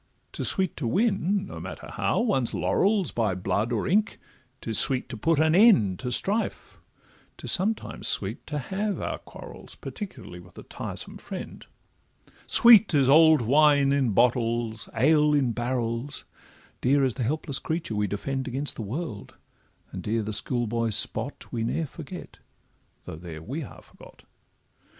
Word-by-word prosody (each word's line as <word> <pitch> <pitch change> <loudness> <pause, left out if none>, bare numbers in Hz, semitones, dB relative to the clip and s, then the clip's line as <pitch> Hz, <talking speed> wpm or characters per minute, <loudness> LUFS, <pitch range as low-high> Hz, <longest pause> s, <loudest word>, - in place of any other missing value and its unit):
'Tis - - -2
sweet 190 -1 0
to 135 - -3
win, 200 - 0
no - - -9
matter - - -8
how, - - 0
one's 195 - 0
laurels, 200 -3 +1
By 110 -5 -1
blood 100 +5 -1
or 115 - -1
ink; 210 +4 +1 0.4
'tis 110 -2 -1
sweet 130 -2 +5
to 120 - -6
put 160 +8 +1
an 155 0 +3
end 175 - +5
To 125 - -4
strife; 205 - -1 0.6
'tis - - -3
sometimes 210 +4 -1
sweet 100 +4 0
to 150 - -4
have 195 +8 -3
our - - -4
quarrels, - - -11
Particularly 190 - -8
with 90 0 -17
a - - -9
tiresome - - -7
friend: - - -8 0.8
Sweet 225 -7 +6
is 135 -2 +3
old 155 -2 +6
wine 140 +2 +4
in 140 -3 +1
bottles, 115 -1 0
ale 150 +4 +3
in 135 -4 +1
barrels; 120 +3 -3 0.6
Dear 135 +2 +3
is 130 - 0
the 130 - -6
helpless 140 +2 -1
creature 160 -7 -3
we 105 -1 0
defend 130 +7 -4
Against 135 +3 -3
the - - -4
world; 110 - -6 0.5
and - - -6
dear 110 +1 -1
the 105 +1 -4
schoolboy 115 +1 0
spot 110 +4 +1
We 115 - -2
ne'er 160 +8 -1
forget, 165 +4 -10 0.6
though - - -8
there 80 -2 -9
we 135 - -5
are 140 - -11
forgot. - - -18
135 Hz, 155 wpm, -26 LUFS, 115-165 Hz, 0.8 s, Sweet